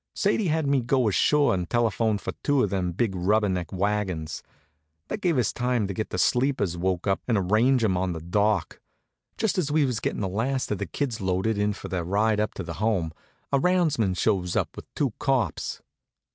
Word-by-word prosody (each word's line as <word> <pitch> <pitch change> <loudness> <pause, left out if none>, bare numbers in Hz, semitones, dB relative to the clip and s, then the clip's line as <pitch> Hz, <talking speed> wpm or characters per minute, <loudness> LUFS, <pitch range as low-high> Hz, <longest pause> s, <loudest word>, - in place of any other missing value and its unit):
Sadie 210 - +1
had 160 -1 +1
me 140 -2 +2
go 125 0 +2
ashore 145 +7 +3
and 90 -2 -2
telephone 115 -2 +1
for - - -5
two 145 -2 +2
of 100 - -1
them 90 -3 -1
big 100 +3 0
rubber 105 +4 +2
neck 90 -4 -2
wagons. 95 -5 -2 0.7
That 215 - -4
gave 170 -5 +2
us 120 -5 +1
time 125 -3 0
to 100 - -3
get 110 +3 -3
the - - -4
sleepers 125 -8 +1
woke 90 0 -1
up 100 -1 +1
and 115 -3 +2
arrange 110 +7 +3
'em 100 -4 +2
on 90 0 0
the 80 - -5
dock. 100 +2 0 0.6
Just 220 -4 0
as 150 -5 -1
we 150 -1 +3
was 125 -5 -1
gettin' - - -2
the 95 - 0
last 120 +8 -1
of 105 - -1
the 100 - -3
kids 130 -8 -3
loaded 95 +4 0
in 105 0 +1
for 100 - -8
their 90 -2 -2
ride 105 +4 +1
up 105 - -1
to 95 - -4
the 85 0 -7
Home, 95 -8 0 0.4
a 140 - +3
roundsman 150 - +2
shows 90 -4 0
up - - -1
with - - -11
two 135 -6 0
cops. 125 - -1
105 Hz, 210 wpm, -26 LUFS, 95-130 Hz, 0.7 s, ashore